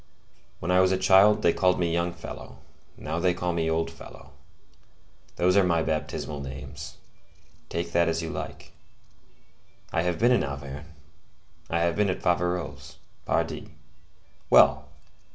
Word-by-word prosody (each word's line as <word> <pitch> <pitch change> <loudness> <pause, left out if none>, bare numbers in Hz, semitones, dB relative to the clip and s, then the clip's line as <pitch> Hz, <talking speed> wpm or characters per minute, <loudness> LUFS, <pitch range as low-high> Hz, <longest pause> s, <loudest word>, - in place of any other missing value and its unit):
When 80 - -3
I 90 - +5
was 95 0 +4
a 95 - +2
child, 105 +3 +5
they 85 - +4
called 90 -1 +2
me 85 -2 0
young 85 +1 0
fellow; - - -10 0.4
now 80 +2 -4
they 90 0 +2
call 90 -1 -2
me 80 -1 0
old 80 0 0
Fellow; - - -13 1.0
those 90 +1 +2
are 100 - +6
my 85 -3 +2
baptismal 75 -2 -3
names; 65 -1 -8 0.7
take 85 0 -3
that 85 0 +3
as 80 0 -1
you 80 -1 -4
like. - - -7 1.2
I 80 - +2
have 90 -1 -1
been 120 +2 +3
in 125 - +3
Auvergne; 70 +1 -6 0.8
I 85 0 0
have 85 0 +1
been 105 0 +2
at 90 - -2
Faverolles. 90 0 -1 0.3
Pardi. - - -2 0.7
Well! - - +5
85 Hz, 150 wpm, -26 LUFS, 80-90 Hz, 1.2 s, are